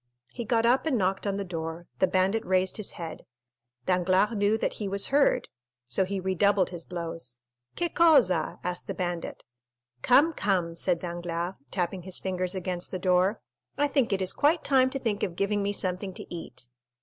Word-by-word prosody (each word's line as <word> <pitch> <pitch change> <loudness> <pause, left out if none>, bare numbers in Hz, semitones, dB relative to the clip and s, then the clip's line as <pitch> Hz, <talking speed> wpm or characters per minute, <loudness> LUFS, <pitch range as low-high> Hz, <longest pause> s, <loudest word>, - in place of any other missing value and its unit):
He 235 - -5
got 230 0 +2
up 255 +6 +3
and 275 -6 +2
knocked 195 0 0
on 200 0 0
the 200 - -3
door; 165 -1 -5
the 190 - +4
bandit 190 +4 +1
raised 185 0 +1
his 215 - -2
head. 165 -2 -7 0.6
Danglars 185 +4 +2
knew 205 +1 +2
that - - -1
he 205 - -1
was 200 0 +1
heard, 285 0 +3 0.4
so 125 +10 +1
he 195 +1 -3
redoubled 190 +1 +2
his 170 -2 -6
blows. 165 -8 -5 0.4
"Che 345 - 0
cosa?" 270 - +4
asked 180 0 -3
the - - -4
bandit. 175 -2 -4 0.6
"Come, 295 - +5
come," 185 - 0
said 170 - 0
Danglars, 175 0 -4 0.2
tapping 180 +2 -2
his 185 +1 -7
fingers 185 0 -2
against 180 -1 -4
the 185 - -3
door, 185 +3 +2 0.4
"I 290 - +3
think 275 -5 +1
it 190 -1 +1
is 185 - +1
quite 310 +3 +2
time 260 -2 +4
to 270 - -3
think 225 -6 -2
of 175 - -2
giving 200 +2 0
me 200 0 0
something 185 -1 -2
to - - -6
eat!" 130 -7 -8
190 Hz, 185 wpm, -28 LUFS, 175-210 Hz, 0.6 s, Come